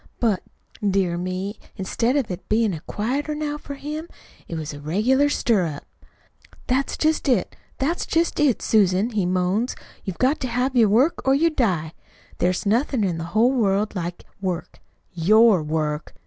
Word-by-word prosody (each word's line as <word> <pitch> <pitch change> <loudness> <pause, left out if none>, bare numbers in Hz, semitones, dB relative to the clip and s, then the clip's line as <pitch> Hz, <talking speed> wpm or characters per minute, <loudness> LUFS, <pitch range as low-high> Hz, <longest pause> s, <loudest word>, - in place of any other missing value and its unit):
But, 215 -6 +1 0.4
dear 190 -3 +1
me, 185 +4 -4 0.2
instead 230 +6 0
of 270 -9 0
its 180 +1 -5
bein' 215 -2 +2
a 160 - -5
quieter 275 +8 -2
now 295 0 -3
for 285 -1 -7
him, 305 +4 -6 0.4
it 170 - -5
was 155 -2 -4
a 145 - -8
regular 220 - +2
stirrup. 180 - 0 0.8
"'That's 265 +2 0
just 310 -2 +1
it, 235 -8 +1 0.2
that's 320 +6 -1
just 335 0 +1
it, 285 -6 +2
Susan,' 200 +1 +3
he 205 -5 0
moans. 185 +6 0 0.3
'You've 190 -3 -5
got 265 +4 +2
to 260 - -2
have 250 +2 0
work 240 +6 +3
or 265 0 +4
you 330 +4 +3
die. 180 - 0 0.5
There's 180 +4 +1
nothin' 235 +3 +1
in 175 -4 -1
the 165 - -4
whole 240 +4 +5
world 210 -4 +1
like 175 -2 -5 0.2
work 180 -2 -4 0.3
YOUR 205 +3 +5
WORK! 150 0 -2
215 Hz, 160 wpm, -23 LUFS, 180-265 Hz, 0.8 s, whole